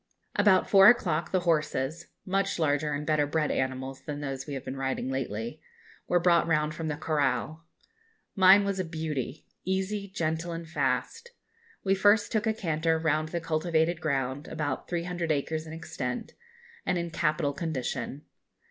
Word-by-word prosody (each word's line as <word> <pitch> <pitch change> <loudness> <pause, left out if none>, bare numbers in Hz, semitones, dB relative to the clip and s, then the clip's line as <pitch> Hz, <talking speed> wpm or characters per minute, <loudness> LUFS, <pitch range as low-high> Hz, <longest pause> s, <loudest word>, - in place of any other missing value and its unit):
About 205 -3 +4
four 195 -1 +8
o'clock 170 -9 +3
the 185 - +2
horses 155 -1 0 0.2
much 195 +1 0
larger 150 -2 +1
and 145 +1 -3
better 150 -2 +2
bred 155 0 0
animals 130 0 -2
than 145 +1 -5
those 135 -1 -5
we 145 - -4
have 135 - -6
been 130 - -4
riding 135 -1 -2
lately 120 +2 -4 0.5
were 175 - +3
brought 170 -1 +4
round 150 -2 +1
from 160 +1 -4
the 150 -1 -2
corral. 155 +1 -1 0.7
Mine 195 +1 +7
was 200 -1 -1
a - - +1
beauty; 155 -4 -4 0.2
easy, 190 +2 -1
gentle, 165 -1 -2
and 165 0 -6
fast. 465 - -2 0.5
We 195 - +3
first 205 +2 +4
took 220 0 0
a 220 - +3
canter 160 -4 0
round 155 -1 0
the 170 - -2
cultivated 160 +1 0
ground, 135 -1 -1
about 145 -4 -3
300 175 -1 -2
acres 155 +2 -1
in 155 - -7
extent, 135 -6 -5 0.5
and 180 - 0
in 170 -1 -3
capital 150 -3 0
condition. 145 -2 -3
160 Hz, 160 wpm, -28 LUFS, 145-175 Hz, 0.7 s, four